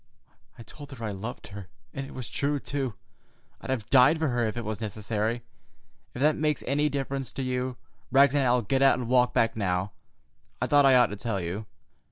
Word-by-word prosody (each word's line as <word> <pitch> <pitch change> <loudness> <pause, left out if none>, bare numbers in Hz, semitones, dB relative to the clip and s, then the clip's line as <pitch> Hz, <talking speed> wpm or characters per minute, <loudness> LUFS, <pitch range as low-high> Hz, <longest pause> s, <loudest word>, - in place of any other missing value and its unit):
I 115 - -10
told 145 +4 -11
her 115 -3 -6
I 105 - -2
loved 105 +5 -7
her! 100 -2 -9 0.3
And 135 0 -5
it - - -12
was 125 -3 -5
true, 145 0 -1
too. 135 -6 -3 0.7
I'd - - -9
have 125 -6 -2
died 140 +4 +6
for 160 -2 0
her 120 -2 0
if 110 - -4
it 120 - -4
was 110 +1 -4
necessary. 110 +2 -2 0.7
If 125 - -2
that 155 +1 +4
makes 150 -1 0
any 145 +3 +1
difference 135 -1 -3
to 135 - -3
you, 125 0 -2 0.3
Rags 140 0 +5
and 145 -1 +2
I'll 125 -1 +2
get 130 +6 0
out 135 -1 +5
and 125 -2 -4
walk 125 0 +3
back 115 - +2
now. 95 -2 -1 0.7
I - - 0
thought 145 -1 +5
I 130 - +6
ought 125 -4 +5
to - - -4
tell 105 -1 -3
you. 95 +5 -5
125 Hz, 215 wpm, -27 LUFS, 110-135 Hz, 0.7 s, died